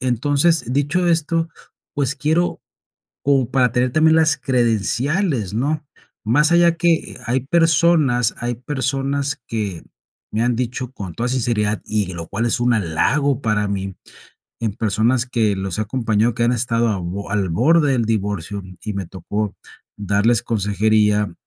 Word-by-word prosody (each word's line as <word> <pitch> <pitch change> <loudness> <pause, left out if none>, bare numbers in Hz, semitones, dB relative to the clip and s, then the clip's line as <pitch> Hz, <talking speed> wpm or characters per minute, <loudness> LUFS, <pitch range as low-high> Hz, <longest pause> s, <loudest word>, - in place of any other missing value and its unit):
entonces, 140 +5 +2
dicho 145 +6 +1
esto, 165 0 +1 0.5
pues 140 -1 0
quiero, 160 +4 0 0.6
como 135 -3 +2
para 125 -3 +3
tener 125 +1 +1
también 160 +3 +4
las 160 -1 +3
credenciales, 120 - 0
¿no? 145 +6 -1 0.4
Más 150 +8 +3
allá 170 -1 +4
que 170 -2 +1
hay 125 +3 +1
personas 155 -5 +2
hay 120 0 -2
personas, 140 +2 -2
que 105 -7 -4 0.5
me 110 - 0
han 120 -1 +1
dicho 125 +1 -3
con 100 -9 -7
toda 120 +1 -2
sinceridad 110 -4 0
y 105 -4 -1
lo 85 -1 -7
cual 110 +4 -2
es 120 - +1
un 120 0 +2
halago 120 - +1
para 105 -3 0
mí, 95 -1 -4 0.7
en 110 -3 -1
personas 115 +4 +1
que 110 -5 0
los 95 -1 -4
he - - +2
acompañado, 115 0 0
que 120 - 0
han 120 - +3
estado 115 -1 +1
al 100 -4 -2
bo 100 +4 -5
al 100 -4 0
borde 145 - +3
del 120 -3 +1
divorcio 100 -3 -2 0.2
y 105 - -4
me 95 -2 -4
tocó 100 +4 -4 0.4
darles 105 +3 +1
consejería 105 -2 +1
120 Hz, 150 wpm, -20 LUFS, 105-140 Hz, 0.7 s, también